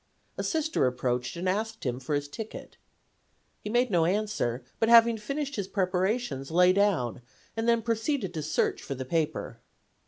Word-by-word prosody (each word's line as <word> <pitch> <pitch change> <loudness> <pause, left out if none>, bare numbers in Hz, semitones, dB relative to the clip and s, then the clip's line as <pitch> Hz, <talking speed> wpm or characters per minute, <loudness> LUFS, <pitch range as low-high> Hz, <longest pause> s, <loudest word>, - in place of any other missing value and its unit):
A - - -3
Sister 315 - +1
approached 125 +1 -1
and 175 +2 -3
asked 220 +4 -1
him 125 -1 -2
for 140 +3 -2
his 145 0 -2
ticket. 215 +9 -8 0.9
He 210 - -4
made 240 +1 +2
no 170 -3 +3
answer, 185 - -1 0.2
but 225 - +2
having 235 0 +7
finished 275 +5 -3
his 200 -2 -2
preparations 185 - -1
lay 180 +2 +5
down 180 - +1 0.3
and 225 +1 0
then 235 -1 +3
proceeded 230 - -1
to 160 - -3
search 150 - 0
for 140 - -5
the 130 0 -5
paper. 155 -5 -2
190 Hz, 165 wpm, -28 LUFS, 145-225 Hz, 0.9 s, having